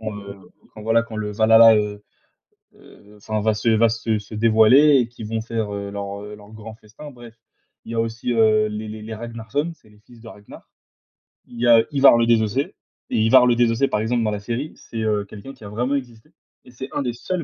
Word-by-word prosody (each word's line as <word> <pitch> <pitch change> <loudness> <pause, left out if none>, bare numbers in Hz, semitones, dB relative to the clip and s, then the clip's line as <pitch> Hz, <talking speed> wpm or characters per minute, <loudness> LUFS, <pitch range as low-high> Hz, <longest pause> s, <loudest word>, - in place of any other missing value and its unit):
quand, 110 -1 -5
heu, 100 0 -10 0.4
quand, 110 - -11
voilà, 115 +2 +2
quand 115 - -11
le 105 -1 -4
Valhalla 110 +1 +6
est, - - +3
heu, 105 0 -6 0.7
heu, 105 +1 -19
enfin, 110 +1 -4
va 110 +1 +1
se 115 - -1
va 115 +1 +4
se 115 -1 -2
se 105 +1 -11
dévoiler 115 +7 +5
et 120 - 0
qu'ils 115 -2 -10
vont 110 +1 -3
faire, 110 -2 -4
heu, 100 0 -6
leur, 100 0 -6
heu, 105 0 -9
leur 105 0 -16
grand 110 0 -10
festin, 110 +7 -13
bref. 120 -3 -14 0.5
Il - - -9
y - - -4
a 115 - +1
aussi, 115 +2 -3
heu, 110 -2 +3
les 105 +1 -6
les 110 0 -8
les 110 +1 -7
Ragnar 115 0 -9
sons, 145 +4 -1
c'est 110 - -25
les 105 0 -22
fils 115 +2 -19
de 115 - -13
Ragnar. 105 -2 -15 0.8
Il 120 - -14
y 120 - +1
a 115 -1 +6
Ivar 140 -4 +5
le 115 - +2
désossé 115 +4 0 0.4
et - - 0
Ivar 115 +3 +5
le 120 - +3
désossé, 120 +2 +1
par 105 - -1
exemple, 115 +1 -1
dans 105 - 0
la 105 - -4
série, 120 +8 -5
c'est, 115 -1 -7
heu, 105 -1 0
quelqu'un 105 +6 -11
qui - - -18
a - - -8
vraiment 120 +6 -2
existé 120 -5 -7 0.3
et - - -16
c'est 130 +2 -9
1 - - -2
des 120 -2 -3
seuls, 170 +9 -4
110 Hz, 240 wpm, -21 LUFS, 105-120 Hz, 0.8 s, Valhalla